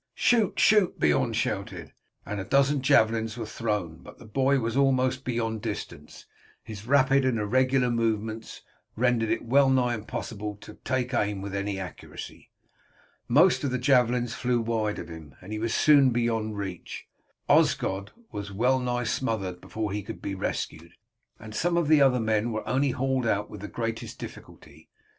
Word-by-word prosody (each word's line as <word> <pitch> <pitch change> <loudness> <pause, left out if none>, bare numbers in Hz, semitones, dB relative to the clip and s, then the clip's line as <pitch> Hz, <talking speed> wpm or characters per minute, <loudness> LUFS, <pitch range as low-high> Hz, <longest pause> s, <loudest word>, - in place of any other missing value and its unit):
"Shoot! 225 -6 +2
shoot!" 210 -4 +4
Beorn 75 -2 +2
shouted, - - -3 0.3
and 105 - -4
a - - -3
dozen 140 +4 +2
javelins 115 -4 +2
were 115 - -4
thrown, 105 -7 -3
but - - -14
the - - -14
boy 135 +5 +2
was 115 -1 -2
almost 130 -1 +2
beyond 115 -3 -2
distance, 100 -9 -7 0.4
and 110 - -7
his 105 +3 -11
rapid 135 0 +4
and 130 -3 +1
irregular 130 +4 +2
movements 110 -1 -2 0.3
rendered 120 -1 +1
it - - -1
well 135 +3 +4
nigh 125 -2 +2
impossible 105 -1 -5
to 105 - -11
take 130 -1 -1
aim 105 -4 0
with 100 0 -6
any 100 0 -2
accuracy. 90 -4 -9 0.8
Most 160 +8 +4
of 140 - 0
the 125 - -1
javelins 125 -2 +2
flew 125 -1 0
wide 110 -2 -1
of - - -7
him, 80 -3 -11
and 95 +4 -9
he 110 - -3
was 115 +1 -1
soon 140 -1 +5
beyond 115 -3 -1
reach. 95 -4 -6 0.4
Osgod 95 +1 +2 0.2
was 100 0 -6
well 125 +6 +2
nigh 125 -1 -1
smothered 110 -6 -2
before 110 -2 -4
he 105 +1 -2
could 100 - -8
be 100 - -4
rescued, 85 -3 -4 0.5
and 110 -1 -10
some 170 +8 0
of 170 -3 +1
the 155 -1 +5
other 130 -2 +4
men 110 +1 0
were 110 -1 -4
only 135 +2 +1
hauled 130 -1 0
out 105 -1 -1
with 105 - -9
the 105 - -5
greatest 115 0 -4
difficulty. - - -12
115 Hz, 170 wpm, -27 LUFS, 105-130 Hz, 0.8 s, soon